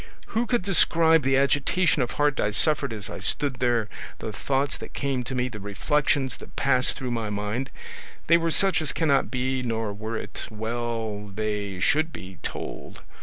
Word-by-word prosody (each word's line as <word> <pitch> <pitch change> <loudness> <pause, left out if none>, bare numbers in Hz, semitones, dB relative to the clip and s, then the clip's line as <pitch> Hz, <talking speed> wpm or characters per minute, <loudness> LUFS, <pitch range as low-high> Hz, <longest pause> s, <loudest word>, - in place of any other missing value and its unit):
Who 235 +2 0
could 240 -5 +1
describe 165 -4 +4
the 135 0 +2
agitation 145 +4 +3
of 125 - -1
heart 145 -1 +1
I 105 - +2
suffered 140 +4 +2
as 105 -3 -4
I - - -6
stood 140 -4 0
there 120 -3 +1 0.3
the 110 - -5
thoughts 135 +6 0
that - - -9
came 135 -3 -1
to 130 - -4
me 125 0 +1
the 115 -4 -7
reflections 130 +7 0
that - - -13
passed 130 -2 +2
through 130 -2 -3
my 115 -3 -2
mind? 105 +6 -2 0.6
They 170 +1 +5
were 165 0 0
such 190 +1 +3
as 155 - +1
cannot 140 -5 +2
be, 130 0 -1
nor 115 -3 -2
were 110 +2 -4
it - - -6
well 110 -1 -3
they 100 -1 -3
should 155 - +3
be, 95 - -9
told. - - -6
125 Hz, 180 wpm, -26 LUFS, 110-145 Hz, 0.6 s, They